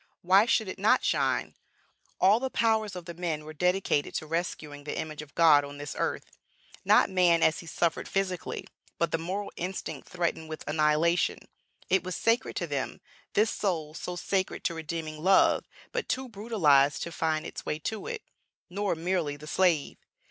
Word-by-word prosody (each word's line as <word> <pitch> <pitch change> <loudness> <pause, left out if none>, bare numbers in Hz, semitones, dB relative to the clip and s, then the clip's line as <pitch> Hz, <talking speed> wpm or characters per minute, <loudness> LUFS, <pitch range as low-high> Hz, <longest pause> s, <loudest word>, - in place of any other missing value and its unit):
Why 190 +5 +5
should 220 -3 +2
it 185 - -6
not 220 +6 +4
shine? - - +1 0.7
all 200 +4 +5
the 265 +1 -2
powers 220 -4 +1
of 180 -2 -7
the 170 - -7
men 165 -3 -3
were 155 - -8
dedicated 180 -2 +1
to - - -2
rescuing 155 -3 -4
the 150 - -4
image 155 -1 -4
of 150 -2 -13
God 155 -4 +6
on 140 0 -8
this 145 -1 -6
earth, - - -2 0.5
not - - +5
man 175 -3 +4
as 160 - +3
he 170 - -10
suffered 165 +1 -1
physically, 190 -3 -2 0.3
but 170 -1 0
the 165 - 0
moral 190 +5 -4
instinct 185 +2 -5
threatened 170 -3 -2
with 155 - -6
annihilation. 155 +3 +2 0.5
It 190 -2 +2
was 185 -1 -4
sacred 230 +2 +1
to - - -1
them, - - -3 0.3
this 215 +1 +3
soul 160 -7 -2
so 180 +2 -5
sacred 190 +2 -1
to 170 - 0
redeeming 160 -1 -5
love, 190 +1 +4 0.3
but 480 -2 -3
too 260 0 -1
brutalized 190 - +3
to 170 - -5
find 160 -2 -1
its - - -7
way 150 - -2
to 220 - -4
it. 460 -2 -5 0.5
Nor 200 -1 -1
merely 165 -3 -1
the 150 - -11
slave. 165 -2 +1
170 Hz, 175 wpm, -28 LUFS, 155-195 Hz, 0.7 s, God